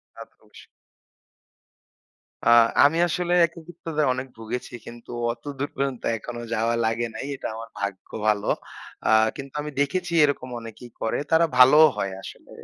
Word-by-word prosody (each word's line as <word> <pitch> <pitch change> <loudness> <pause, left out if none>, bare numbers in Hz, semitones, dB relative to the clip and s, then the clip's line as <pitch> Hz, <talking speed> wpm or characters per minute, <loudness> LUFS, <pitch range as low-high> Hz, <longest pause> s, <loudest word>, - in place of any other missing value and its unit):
তা - - -11
তো - - -35
অবশ্যই। - - -16 1.8
আ - - +6 0.3
আমি 145 +3 +4
আসলে 175 +1 -1
একাকিত্বতায় 165 -2 -4
অনেক 130 +1 -5
ভুগেছি 115 +3 -6
কিন্তু 120 0 -11 0.2
অতদূর 140 +3 -5
পর্যন্ত 135 -2 -2 0.2
এখনো 120 +2 -7
যাওয়া 115 +1 +1
লাগে 115 +2 0
নাই। 110 - -6
এটা - - -5
আমার 115 0 -8
ভাগ্য 100 -1 -5 0.2
ভালো। 105 -1 +1 0.6
আ - - +2 0.3
কিন্তু 140 -1 -9
আমি 150 0 -6
দেখেছি 175 +5 -1
এরকম 140 -3 0
অনেকেই 115 +2 -11
করে। 110 - 0
তারা 165 +1 +5
ভালোও 150 +5 +8
হয় 100 -1 -2
আসলে। - - -12
130 Hz, 145 wpm, -24 LUFS, 115-150 Hz, 1.8 s, ভালোও